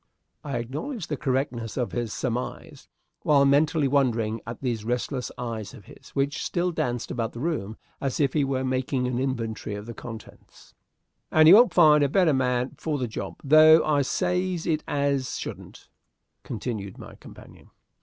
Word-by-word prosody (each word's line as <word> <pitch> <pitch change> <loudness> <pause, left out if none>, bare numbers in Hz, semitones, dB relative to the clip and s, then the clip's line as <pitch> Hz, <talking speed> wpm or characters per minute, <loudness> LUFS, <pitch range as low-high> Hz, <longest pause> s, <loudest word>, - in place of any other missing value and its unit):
I 140 -4 -3
acknowledged 155 - -5
the 150 - -1
correctness 130 -5 -2
of 125 -2 -1
his 120 -3 -3
surmise, 125 +1 -5 0.3
while 140 -2 +4
mentally 150 +2 +3
wondering 115 -5 +1
at 115 - -6
those 120 -5 -2
restless 125 +2 -2
eyes 115 -1 -5
of 105 -6 -14
his, - - -15
which 140 0 -1
still 180 +1 -1
danced 120 -7 -2
about 115 -1 -3
the 120 - -8
room 125 -9 -3 0.2
as 135 -2 -2
if 140 -3 +2
he 150 - +2
were 135 -1 -1
making 130 0 -1
an 125 -1 -1
inventory 115 -5 -3
of 105 0 -7
the 115 - -7
contents. 115 -1 -12 0.6
"And 155 0 +6
you 170 - +10
won't 235 +4 +7
find 150 -4 +6
a 140 - +2
better 175 -1 +3
man 125 -1 0
for 155 -2 -2
the 125 -3 -2
job, 110 - -6
though 155 +2 +7
I 150 -2 +2
says 180 +5 -1
it 155 -2 0
as 140 -2 -1
shouldn't," - - -8 0.5
continued 105 -4 -5
my - - -11
companion. - - -15
130 Hz, 170 wpm, -25 LUFS, 120-150 Hz, 0.6 s, you